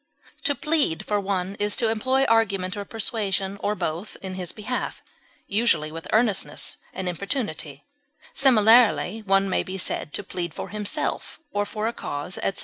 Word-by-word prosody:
To 285 Hz, -, +3 dB
plead 300 Hz, -, +1 dB
for 210 Hz, -1 st, +1 dB
one 195 Hz, -1 st, -1 dB
is 205 Hz, 0 st, +1 dB
to 230 Hz, -, +2 dB
employ 260 Hz, +5 st, +2 dB
argument 200 Hz, -5 st, +2 dB
or 205 Hz, -1 st, -4 dB
persuasion, 200 Hz, -3 st, -2 dB
or 210 Hz, +1 st, 0 dB
both 170 Hz, +3 st, -3 dB
in 190 Hz, -1 st, -4 dB
his 180 Hz, -2 st, -4 dB
behalf, 235 Hz, +4 st, -4 dB, 0.4 s
usually 195 Hz, -8 st, +2 dB
with 165 Hz, +1 st, -7 dB
earnestness 220 Hz, -3 st, +1 dB, 0.2 s
or 190 Hz, -, -3 dB
importunity; 170 Hz, -, -3 dB, 0.5 s
similarly 225 Hz, -4 st, +5 dB
one 195 Hz, -2 st, +2 dB
may 190 Hz, -, +1 dB
be 190 Hz, +1 st, -5 dB
said 160 Hz, -3 st, -2 dB
to -, -, -2 dB
plead 175 Hz, -4 st, -4 dB
for -, -, -5 dB
himself 210 Hz, +8 st, -2 dB
or 205 Hz, 0 st, 0 dB
for 215 Hz, 0 st, -3 dB
a 230 Hz, -, -1 dB
cause, 145 Hz, +1 st, -4 dB
etc. 195 Hz, -, -1 dB
200 Hz, 160 wpm, -25 LUFS, 185-225 Hz, 0.5 s, similarly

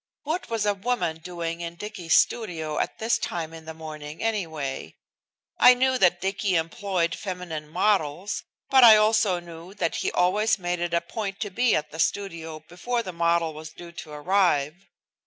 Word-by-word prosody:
What 320 Hz, +5 st, -3 dB
was 225 Hz, -2 st, -1 dB
a 205 Hz, -, +3 dB
woman 195 Hz, -6 st, -1 dB
doing 170 Hz, 0 st, -5 dB
in 170 Hz, 0 st, -5 dB
Dicky's 180 Hz, -4 st, -1 dB
studio 160 Hz, -9 st, +1 dB
at -, -, -2 dB
this 225 Hz, +1 st, +1 dB
time 165 Hz, -2 st, -4 dB
in 160 Hz, -1 st, -11 dB
the 160 Hz, -, -7 dB
morning, 155 Hz, -1 st, -8 dB
anyway? 160 Hz, -11 st, -3 dB, 0.6 s
I 250 Hz, 0 st, +8 dB
knew 260 Hz, 0 st, +2 dB
that 175 Hz, -1 st, +4 dB
Dicky 195 Hz, +1 st, -1 dB
employed 170 Hz, +1 st, 0 dB
feminine 180 Hz, -6 st, -6 dB
models, 185 Hz, 0 st, 0 dB, 0.3 s
but 265 Hz, -2 st, +7 dB
I 220 Hz, -2 st, +10 dB
also 215 Hz, -3 st, +3 dB
knew 170 Hz, +2 st, -11 dB
that 165 Hz, -5 st, -1 dB
he -, -, -1 dB
always 210 Hz, +5 st, +2 dB
made 175 Hz, -2 st, -2 dB
it 170 Hz, 0 st, -1 dB
a 170 Hz, -, +2 dB
point 195 Hz, +3 st, -5 dB
to 205 Hz, -2 st, -3 dB
be 245 Hz, +5 st, +2 dB
at 150 Hz, 0 st, -2 dB
the 160 Hz, -, -9 dB
studio 165 Hz, -5 st, -2 dB
before 235 Hz, +7 st, -3 dB
the 185 Hz, -, -6 dB
model 170 Hz, -1 st, +1 dB
was 155 Hz, +1 st, -8 dB
due 175 Hz, -1 st, -11 dB
to 165 Hz, -2 st, -9 dB
arrive. 170 Hz, 0 st, +1 dB
175 Hz, 175 wpm, -25 LUFS, 160-205 Hz, 0.6 s, I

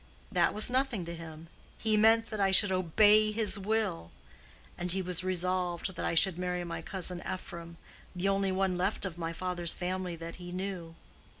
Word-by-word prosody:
That -, -, +2 dB
was 215 Hz, +3 st, +1 dB
nothing 255 Hz, -8 st, 0 dB
to 170 Hz, -, -6 dB
him: 160 Hz, -1 st, -10 dB, 0.3 s
he 220 Hz, -1 st, +1 dB
meant 225 Hz, +1 st, +4 dB
that 215 Hz, -, -4 dB
I 195 Hz, -1 st, +3 dB
should 190 Hz, +1 st, +6 dB
obey 210 Hz, +4 st, +4 dB
his 215 Hz, -1 st, +2 dB
will. 200 Hz, -, -1 dB, 0.7 s
And 175 Hz, 0 st, -2 dB
he 190 Hz, -, +1 dB
was 180 Hz, -1 st, 0 dB
resolved 185 Hz, 0 st, -1 dB
that -, -, -4 dB
I -, -, 0 dB
should 180 Hz, +1 st, +3 dB
marry 180 Hz, -1 st, -2 dB
my 170 Hz, -1 st, -5 dB
cousin 180 Hz, -2 st, -3 dB
Ephraim, 170 Hz, -2 st, -7 dB, 0.4 s
the 180 Hz, +2 st, -1 dB
only 195 Hz, 0 st, +1 dB
one 185 Hz, -1 st, 0 dB
left 185 Hz, -, 0 dB
of 175 Hz, -3 st, -5 dB
my 165 Hz, -1 st, -3 dB
father's 175 Hz, -1 st, -2 dB
family 180 Hz, -1 st, -3 dB
that 165 Hz, 0 st, -8 dB
he 175 Hz, -1 st, -9 dB
knew. 180 Hz, -3 st, -5 dB
185 Hz, 185 wpm, -30 LUFS, 170-200 Hz, 0.7 s, should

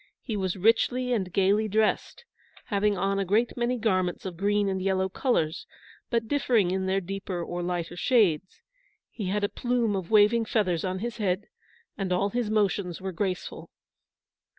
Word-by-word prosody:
He 225 Hz, -, -3 dB
was 190 Hz, -2 st, -2 dB
richly 245 Hz, +5 st, +2 dB
and 190 Hz, -6 st, -1 dB
gayly 200 Hz, +4 st, +2 dB
dressed, 220 Hz, -, 0 dB, 0.4 s
having 205 Hz, -1 st, +1 dB
on 195 Hz, +1 st, 0 dB
a -, -, +1 dB
great 215 Hz, +6 st, +1 dB
many 245 Hz, +1 st, 0 dB
garments 185 Hz, -6 st, 0 dB
of 185 Hz, -2 st, -5 dB
green 205 Hz, +3 st, +1 dB
and 190 Hz, -1 st, -1 dB
yellow 190 Hz, 0 st, +1 dB
colours, 185 Hz, -, -1 dB, 0.4 s
but 230 Hz, -2 st, 0 dB
differing 230 Hz, -8 st, +2 dB
in 190 Hz, 0 st, -1 dB
their 190 Hz, +1 st, +2 dB
deeper 195 Hz, -1 st, -4 dB
or 175 Hz, +1 st, -4 dB
lighter 175 Hz, -1 st, -3 dB
shades. 190 Hz, -, +1 dB, 0.5 s
He 205 Hz, -5 st, -5 dB
had 205 Hz, +2 st, -1 dB
a -, -, +3 dB
plume 240 Hz, -2 st, 0 dB
of 185 Hz, -3 st, -4 dB
waving 220 Hz, +2 st, +5 dB
feathers 185 Hz, -7 st, 0 dB
on 185 Hz, 0 st, -2 dB
his 235 Hz, -1 st, -5 dB
head, 200 Hz, -2 st, -1 dB, 0.5 s
and 190 Hz, -2 st, -2 dB
all 195 Hz, +3 st, +1 dB
his 240 Hz, -2 st, -1 dB
motions 200 Hz, -4 st, 0 dB
were 190 Hz, 0 st, -4 dB
graceful. 185 Hz, +1 st, -4 dB
195 Hz, 170 wpm, -27 LUFS, 185-220 Hz, 0.5 s, waving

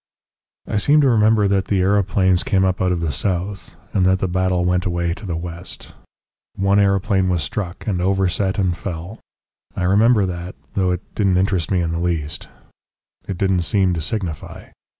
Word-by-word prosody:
"I 105 Hz, -, -2 dB
seem 145 Hz, +9 st, +4 dB
to 140 Hz, -, +4 dB
remember 110 Hz, -2 st, +4 dB
that 95 Hz, -1 st, +1 dB
the 95 Hz, -2 st, +1 dB
aeroplanes 95 Hz, -1 st, +2 dB
came 95 Hz, -1 st, +1 dB
up 95 Hz, -1 st, 0 dB
out 90 Hz, -1 st, +2 dB
of 85 Hz, -2 st, -1 dB
the 80 Hz, -2 st, -1 dB
south, 95 Hz, +3 st, -3 dB, 0.2 s
and 95 Hz, -, +2 dB
that 95 Hz, 0 st, +3 dB
the 95 Hz, -, -1 dB
battle 90 Hz, 0 st, 0 dB
went 90 Hz, 0 st, +1 dB
away 85 Hz, -1 st, -1 dB
to 100 Hz, +3 st, -9 dB
the 85 Hz, -, -2 dB
west. 85 Hz, +1 st, -7 dB, 0.6 s
One 100 Hz, +1 st, +2 dB
aeroplane 100 Hz, -1 st, +2 dB
was 85 Hz, -3 st, 0 dB
struck, 95 Hz, -3 st, -5 dB
and 95 Hz, -5 st, -1 dB
overset 95 Hz, 0 st, 0 dB
and 95 Hz, -3 st, +1 dB
fell. 85 Hz, +3 st, -6 dB, 0.6 s
I 95 Hz, -, -2 dB
remember 105 Hz, +3 st, +4 dB
that 90 Hz, 0 st, -5 dB, 0.2 s
though 95 Hz, -2 st, +1 dB
it 90 Hz, 0 st, -1 dB
didn't 95 Hz, -4 st, +2 dB
interest 95 Hz, -4 st, 0 dB
me 90 Hz, -2 st, +1 dB
in 85 Hz, -1 st, -1 dB
the 85 Hz, -, -2 dB
least. 85 Hz, -2 st, -2 dB, 0.8 s
It 95 Hz, -, -4 dB
didn't 95 Hz, -1 st, +1 dB
seem 95 Hz, +1 st, +1 dB
to 85 Hz, -, -2 dB
signify. 90 Hz, -2 st, -5 dB
95 Hz, 185 wpm, -20 LUFS, 90-100 Hz, 0.8 s, seem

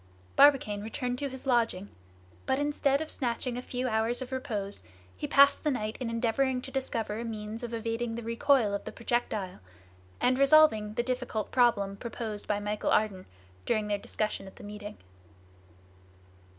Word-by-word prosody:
Barbicane 270 Hz, -8 st, +5 dB
returned 245 Hz, +3 st, -3 dB
to 280 Hz, -, -2 dB
his 265 Hz, 0 st, -10 dB
lodging; 230 Hz, -6 st, +1 dB, 0.6 s
but 265 Hz, -, +2 dB
instead 290 Hz, -1 st, +1 dB
of 315 Hz, -, -4 dB
snatching 245 Hz, -1 st, -2 dB
a 250 Hz, -, -3 dB
few 250 Hz, 0 st, -3 dB
hours 225 Hz, +1 st, +1 dB
of 260 Hz, 0 st, -5 dB
repose, 215 Hz, -, -3 dB, 0.3 s
he 90 Hz, -, -4 dB
passed 280 Hz, 0 st, +5 dB
the 305 Hz, -, +2 dB
night 215 Hz, -5 st, -2 dB
in 250 Hz, -3 st, -3 dB
endeavoring 250 Hz, +3 st, +1 dB
to 265 Hz, -, -7 dB
discover 225 Hz, -5 st, -2 dB
a -, -, -3 dB
means 220 Hz, -1 st, -5 dB
of 240 Hz, -1 st, -5 dB
evading 230 Hz, 0 st, -2 dB
the 235 Hz, -, -5 dB
recoil 230 Hz, -1 st, +2 dB
of 200 Hz, -, -2 dB
the -, -, -5 dB
projectile, 220 Hz, -6 st, -2 dB, 0.6 s
and 255 Hz, +1 st, +2 dB
resolving 275 Hz, -8 st, +5 dB
the 240 Hz, -, +1 dB
difficult 250 Hz, -4 st, -3 dB
problem 220 Hz, -6 st, +3 dB
proposed 225 Hz, -3 st, -5 dB
by 205 Hz, -1 st, 0 dB
Michel 210 Hz, 0 st, -2 dB
Ardan 200 Hz, -4 st, +1 dB, 0.4 s
during 215 Hz, -3 st, +1 dB
the 205 Hz, -, +1 dB
discussion 210 Hz, -1 st, -3 dB
at 190 Hz, -, -12 dB
the -, -, -13 dB
meeting. 210 Hz, 0 st, -8 dB
230 Hz, 165 wpm, -29 LUFS, 210-255 Hz, 0.6 s, Barbicane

